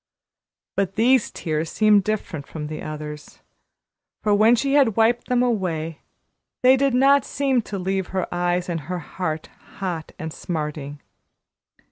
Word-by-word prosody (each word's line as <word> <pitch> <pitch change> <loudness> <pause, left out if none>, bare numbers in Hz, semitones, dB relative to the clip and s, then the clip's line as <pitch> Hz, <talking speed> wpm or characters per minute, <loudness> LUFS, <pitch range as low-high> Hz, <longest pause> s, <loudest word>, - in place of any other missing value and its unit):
But 195 -1 -1
these 245 +2 +4
tears 155 0 -3
seemed 210 -2 +4
different 185 -8 -3
from 150 -2 -6
the 155 +1 -6
others, 150 -1 -7 0.8
for 210 -1 +3
when 220 +4 +6
she 275 +4 0
had 270 -8 +4
wiped 230 +2 +2
them 250 0 +2
away 170 -9 -1 0.6
they 255 +1 +7
did 270 -1 +2
not 275 +2 +5
seem 270 -3 0
to 205 -2 -6
leave 190 0 -1
her 190 -1 -2
eyes 175 0 0
and 170 -2 -2
her 180 - -1
heart 160 -1 -4 0.3
hot 175 -5 -4
and 160 -1 -5
smarting. 150 -3 -5
190 Hz, 145 wpm, -23 LUFS, 160-235 Hz, 0.8 s, they